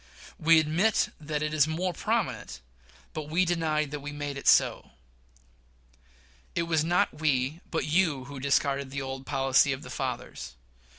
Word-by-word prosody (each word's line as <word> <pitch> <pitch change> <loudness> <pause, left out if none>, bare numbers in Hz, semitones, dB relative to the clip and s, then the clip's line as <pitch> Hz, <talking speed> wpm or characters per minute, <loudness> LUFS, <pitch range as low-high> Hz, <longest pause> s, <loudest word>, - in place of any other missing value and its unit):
We 160 0 +6
admit 165 +8 +2
that 150 0 -3
it 150 0 -2
is 155 -1 +4
more 175 +3 -1
prominent, 70 - -2 0.5
but 155 -1 -5
we 175 +4 +2
deny 160 -3 0
that 150 +1 -6
we 145 +1 -6
made 145 -1 -5
it 140 - -6
so. - - +3 1.6
It 170 - +1
was 160 -2 +1
not 175 -1 +1
we, 145 +1 0
but 165 - -1
you, 155 -4 +1
who 140 0 -8
discarded 140 0 +1
the 140 0 -4
old 135 0 -6
policy 135 0 +3
of 135 - -7
the - - -9
fathers. 120 - -5
150 Hz, 160 wpm, -28 LUFS, 140-160 Hz, 1.6 s, We